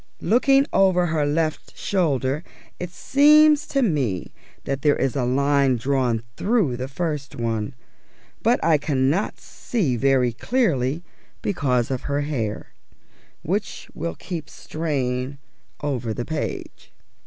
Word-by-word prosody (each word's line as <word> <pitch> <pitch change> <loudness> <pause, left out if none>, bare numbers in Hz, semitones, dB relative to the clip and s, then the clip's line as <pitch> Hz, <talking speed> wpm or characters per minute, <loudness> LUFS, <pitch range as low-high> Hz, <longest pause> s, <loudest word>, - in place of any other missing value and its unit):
Looking 270 +7 +4
over 185 -2 +4
her 155 -3 0
left 155 +1 -2
shoulder 145 -6 0 0.4
it 180 - -4
seems 300 - +5
to 275 -1 +1
me 135 - -1 0.3
that 135 0 -3
there 145 0 +4
is 135 0 -1
a 130 -3 0
line 140 +1 +2
drawn 125 -3 0
through 200 - +1
the 130 +2 -4
first 145 -1 -3
one, 115 +1 -2 0.7
but 235 +3 +3
I 160 -3 +4
cannot 145 +6 0
see 175 - -2
very 130 -1 +2
clearly 160 - 0 0.4
because 135 - 0
of 130 +2 -3
her 140 +1 0
hair, 125 -8 -3 0.7
which - - -3
will 85 0 -4
keep 165 -5 -6
straying 135 -4 -3 0.5
over 125 -6 -2
the 120 - -3
page. 155 -1 -5
145 Hz, 125 wpm, -23 LUFS, 130-175 Hz, 0.7 s, seems